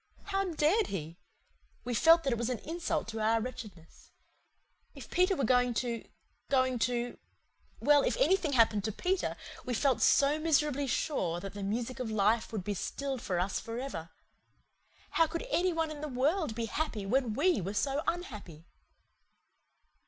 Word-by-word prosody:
How 390 -1 -1
dared 355 +5 +2
he? 165 -2 -6 0.6
We 245 - -3
felt 330 +8 +6
that 270 - +1
it 235 - -2
was 235 +1 -1
an 250 - -1
insult 335 +2 -2
to 225 -1 -5
our 220 +1 +2
wretchedness. 215 -8 -9 0.9
If - - -11
Peter 365 +2 +3
were 275 - -1
going 245 0 +3
to 235 0 -2 0.5
going 260 -2 +2
to 245 0 -3 0.6
well, 290 -1 +5
if - - 0
anything 380 -11 +2
happened 225 -4 +4
to 220 - -1
Peter, 365 - -1 0.3
we 250 - -2
felt 270 +1 +2
so 285 +2 +4
miserably 300 -3 +1
sure 180 - -1
that 195 +1 -7
the 205 - -7
music 235 +6 -3
of 250 -3 -3
life 215 +1 +1
would 215 -5 -3
be 205 - -2
stilled 270 +6 -4
for 180 -2 -1
us 190 +2 -1
for 230 0 -6
ever. 240 -11 -5 1.0
How 330 - +3
could 335 +9 -4
any 365 +1 +2
one 325 -2 -1
in 295 -1 -7
the 305 - -3
world 285 - 0
be 230 0 -2
happy 225 -5 -3
when 235 +1 +1
we 360 - +2
were 195 +4 -4
so 275 +5 0
unhappy? 210 - -5
255 Hz, 170 wpm, -31 LUFS, 220-310 Hz, 1.0 s, felt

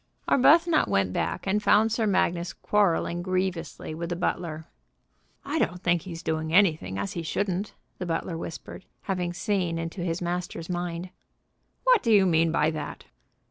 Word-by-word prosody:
Arbuthnot 320 +4 +5
went 95 -2 +1
back, 175 - -2
and 200 +2 +1
found 215 +2 +4
Sir 225 0 +1
Magnus 175 -3 +1
quarrelling 175 -4 +1
grievously 185 -4 -2
with 170 +2 -5
the 175 - -1
butler. 170 -2 -2 0.8
"I - - -1
don't 180 +2 -1
think 170 -1 +2
he's 170 -2 -8
doing 160 0 -2
anything 160 - +3
as 100 0 -3
he 170 - -3
shouldn't," 195 +4 -2 0.2
the 180 - -4
butler 165 +1 -2
whispered, 165 +3 -7 0.2
having 180 -3 -2
seen 180 -3 -1
into 165 +3 -4
his 170 -1 -1
master's 175 -1 -4
mind. 175 0 -4 0.7
"What - - +5
do 230 - +1
you 200 -3 +6
mean 165 -2 +3
by 155 -1 +2
that?" 155 -2 -6
175 Hz, 160 wpm, -26 LUFS, 165-195 Hz, 0.8 s, you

